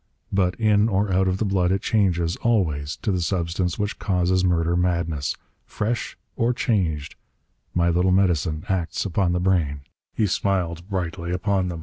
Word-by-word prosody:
But 90 Hz, -2 st, +2 dB
in 110 Hz, -1 st, +3 dB
or 100 Hz, -1 st, +1 dB
out 95 Hz, +1 st, +3 dB
of 95 Hz, 0 st, +1 dB
the 110 Hz, -, -1 dB
blood 95 Hz, -2 st, +1 dB
it 95 Hz, 0 st, 0 dB
changes, 90 Hz, -5 st, +1 dB
always, 80 Hz, -11 st, 0 dB
to 110 Hz, -, +1 dB
the 90 Hz, -2 st, 0 dB
substance 85 Hz, 0 st, -1 dB
which 105 Hz, -1 st, -3 dB
causes 95 Hz, -1 st, +1 dB
murder 85 Hz, -1 st, +2 dB
madness. 85 Hz, -5 st, 0 dB, 0.3 s
Fresh 110 Hz, +2 st, -3 dB, 0.2 s
or 115 Hz, +2 st, +1 dB
changed, 85 Hz, -, -1 dB, 0.6 s
my 85 Hz, -1 st, +3 dB
little 90 Hz, +2 st, +2 dB
medicine 85 Hz, -4 st, +1 dB
acts 95 Hz, -3 st, -1 dB
upon 95 Hz, -1 st, +1 dB
the 90 Hz, -, +1 dB
brain." 85 Hz, -6 st, +1 dB, 0.3 s
He 110 Hz, -, +2 dB
smiled 90 Hz, -2 st, -1 dB
brightly 85 Hz, -2 st, -3 dB
upon 95 Hz, +1 st, 0 dB
them. 85 Hz, -2 st, -5 dB
90 Hz, 160 wpm, -23 LUFS, 85-100 Hz, 0.6 s, in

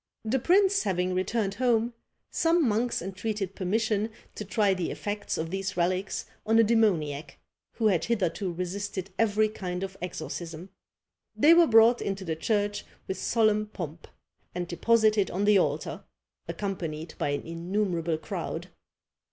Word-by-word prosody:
The 250 Hz, +5 st, +1 dB
prince 385 Hz, +7 st, +4 dB
having 185 Hz, -3 st, 0 dB
returned 195 Hz, +2 st, 0 dB
home, 235 Hz, 0 st, +1 dB, 0.4 s
some 330 Hz, -3 st, +3 dB
monks 230 Hz, -1 st, 0 dB
entreated 195 Hz, +1 st, -3 dB
permission 215 Hz, +3 st, 0 dB, 0.2 s
to -, -, -6 dB
try 205 Hz, -1 st, +2 dB
the 185 Hz, -3 st, -2 dB
effects 205 Hz, 0 st, -3 dB
of 160 Hz, +1 st, -3 dB
these 195 Hz, 0 st, -3 dB
relics 185 Hz, +2 st, 0 dB, 0.2 s
on 225 Hz, +1 st, +3 dB
a 230 Hz, -, +7 dB
demoniac, 180 Hz, -10 st, +1 dB, 0.4 s
who 225 Hz, -, -2 dB
had 180 Hz, -6 st, +3 dB
hitherto 195 Hz, -4 st, -1 dB
resisted 190 Hz, +2 st, -4 dB
every 215 Hz, -1 st, +3 dB
kind 185 Hz, -4 st, -5 dB
of 190 Hz, 0 st, -5 dB
exorcism. 170 Hz, +1 st, -6 dB, 0.6 s
They 310 Hz, +3 st, +6 dB
were 340 Hz, -1 st, +6 dB
brought 230 Hz, +1 st, +6 dB
into 195 Hz, -1 st, -3 dB
the 160 Hz, -2 st, -2 dB
church 205 Hz, +4 st, 0 dB, 0.2 s
with 190 Hz, -, -3 dB
solemn 215 Hz, -2 st, +2 dB
pomp, 170 Hz, -6 st, -7 dB, 0.5 s
and 175 Hz, -1 st, -2 dB
deposited 215 Hz, +2 st, +3 dB
on 195 Hz, +3 st, -1 dB
the 205 Hz, -1 st, +6 dB
altar, -, -, -2 dB, 0.4 s
accompanied 165 Hz, -5 st, -4 dB
by -, -, 0 dB
an 145 Hz, 0 st, -2 dB
innumerable 170 Hz, -1 st, -1 dB
crowd. -, -, -5 dB
200 Hz, 145 wpm, -28 LUFS, 180-220 Hz, 0.6 s, a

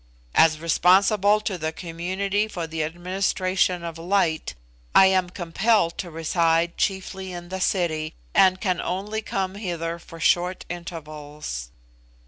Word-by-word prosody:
"As 155 Hz, -1 st, +5 dB
responsible 190 Hz, +5 st, +4 dB
to 195 Hz, -4 st, -3 dB
the 155 Hz, 0 st, -2 dB
community 185 Hz, +5 st, -2 dB
for 175 Hz, -6 st, -4 dB
the 160 Hz, 0 st, -4 dB
administration 185 Hz, +1 st, 0 dB
of 165 Hz, -1 st, -6 dB
light, 165 Hz, -, 0 dB, 0.4 s
I 195 Hz, -, +9 dB
am 185 Hz, -1 st, +3 dB
compelled 180 Hz, +1 st, +1 dB
to 180 Hz, -, -4 dB
reside 165 Hz, +1 st, +1 dB
chiefly 190 Hz, -1 st, -2 dB
in 175 Hz, -1 st, -8 dB
the 190 Hz, 0 st, -4 dB
city, 160 Hz, -5 st, 0 dB, 0.2 s
and 185 Hz, -1 st, +5 dB
can 185 Hz, -4 st, 0 dB
only 205 Hz, +4 st, -3 dB
come 190 Hz, -3 st, -2 dB
hither 170 Hz, -4 st, -4 dB
for 165 Hz, 0 st, -12 dB
short 180 Hz, +2 st, +1 dB
intervals." 150 Hz, -, -7 dB
175 Hz, 130 wpm, -24 LUFS, 165-190 Hz, 0.4 s, I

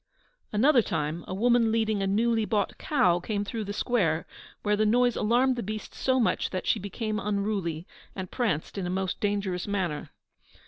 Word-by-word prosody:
Another 245 Hz, +4 st, +5 dB
time, 155 Hz, -3 st, -2 dB
a -, -, -4 dB
woman 235 Hz, +1 st, +3 dB
leading 220 Hz, -2 st, +1 dB
a 195 Hz, -, 0 dB
newly 225 Hz, +3 st, +2 dB
bought 210 Hz, -2 st, -1 dB
cow 180 Hz, -, +2 dB
came 205 Hz, +2 st, -2 dB
through 220 Hz, +1 st, -4 dB
the 200 Hz, -, -4 dB
square, 190 Hz, -8 st, +1 dB, 0.4 s
where 210 Hz, 0 st, +2 dB
the 215 Hz, -, +2 dB
noise 245 Hz, +2 st, +3 dB
alarmed 245 Hz, +4 st, +2 dB
the -, -, -1 dB
beast 215 Hz, +1 st, -5 dB
so 260 Hz, 0 st, +1 dB
much 230 Hz, -, +1 dB
that 185 Hz, -1 st, -4 dB
she -, -, +2 dB
became 215 Hz, +2 st, -3 dB
unruly, 200 Hz, -6 st, -2 dB, 0.3 s
and 185 Hz, -2 st, -6 dB
pranced 205 Hz, -, -1 dB
in 180 Hz, -, -2 dB
a -, -, -3 dB
most 190 Hz, 0 st, -2 dB
dangerous 200 Hz, -3 st, -1 dB
manner. 185 Hz, -7 st, -2 dB
210 Hz, 180 wpm, -27 LUFS, 185-230 Hz, 0.4 s, Another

